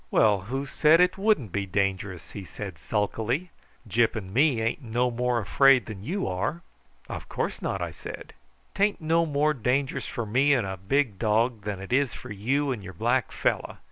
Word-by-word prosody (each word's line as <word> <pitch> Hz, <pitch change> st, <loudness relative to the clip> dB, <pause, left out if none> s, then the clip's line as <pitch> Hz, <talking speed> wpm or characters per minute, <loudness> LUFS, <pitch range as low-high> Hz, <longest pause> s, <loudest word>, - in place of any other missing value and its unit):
"Well, 105 Hz, -3 st, +4 dB
who 135 Hz, +2 st, -2 dB
said 155 Hz, +3 st, +4 dB
it 180 Hz, 0 st, +4 dB
wouldn't 195 Hz, -, +2 dB
be 100 Hz, +1 st, -2 dB
dangerous?" 95 Hz, -1 st, -2 dB
he 100 Hz, -, -7 dB
said 80 Hz, -, -8 dB
sulkily. 115 Hz, -, -1 dB, 0.4 s
"Gyp 115 Hz, +3 st, +2 dB
and 95 Hz, -4 st, -6 dB
me 135 Hz, -1 st, +3 dB
ain't 115 Hz, +6 st, -1 dB
no 120 Hz, +1 st, 0 dB
more 125 Hz, +1 st, 0 dB
afraid 125 Hz, +5 st, +4 dB
than 105 Hz, -4 st, -8 dB
you 190 Hz, -, -2 dB
are." 100 Hz, -, -2 dB, 0.4 s
"Of -, -, -7 dB
course -, -, -3 dB
not," -, -, -2 dB
I -, -, -4 dB
said. -, -, -9 dB, 0.4 s
"'Tain't 205 Hz, +1 st, +1 dB
no 165 Hz, +1 st, +2 dB
more 150 Hz, +1 st, +2 dB
dangerous 130 Hz, +2 st, -1 dB
for 115 Hz, -, -4 dB
me 130 Hz, +7 st, +3 dB
and 120 Hz, -6 st, 0 dB
a 95 Hz, 0 st, -3 dB
big 105 Hz, +2 st, 0 dB
dog 115 Hz, +1 st, +1 dB
than 105 Hz, -2 st, -3 dB
it 95 Hz, +5 st, -5 dB
is 135 Hz, -1 st, +2 dB
for -, -, -9 dB
you 135 Hz, +8 st, 0 dB
and 115 Hz, -6 st, -4 dB
your 95 Hz, 0 st, -8 dB
black 120 Hz, +7 st, 0 dB
fellow. -, -, -1 dB
120 Hz, 190 wpm, -26 LUFS, 105-140 Hz, 0.4 s, Well